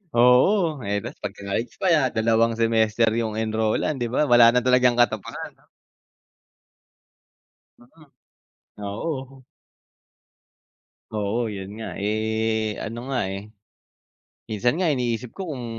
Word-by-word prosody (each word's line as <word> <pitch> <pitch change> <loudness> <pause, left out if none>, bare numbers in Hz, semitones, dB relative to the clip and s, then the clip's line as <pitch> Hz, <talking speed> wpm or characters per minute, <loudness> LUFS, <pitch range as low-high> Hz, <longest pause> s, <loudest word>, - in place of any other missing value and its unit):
Oo. 140 - +4
Eh, 100 0 0
tapos - - -8
magka-college 100 +4 -4
pa 190 - +1
iyan, 140 -6 +3
dalawang 115 +1 +2
semester 115 0 +2
'yung 110 -2 -2
enrollan, 110 +6 0
'di 120 -1 -2
ba? 150 - +2
Wala 120 -1 +7
na 125 - +3
talagang 125 -1 +4
katapusan. 110 -4 -1 2.3
Mm. 120 - -18 1.0
Oo. 130 +4 -5 1.7
Oo 110 +2 -1
iyun 95 0 -7
nga, - - -5
eh, 110 +1 -1
ano 120 +4 -6
nga 125 -7 0
eh, 100 +2 -7 1.0
minsan 120 - 0
nga 180 - +2
iniisip 125 -4 -1
ko 195 - -6
kung 125 -4 -6
115 Hz, 115 wpm, -24 LUFS, 110-125 Hz, 2.3 s, Wala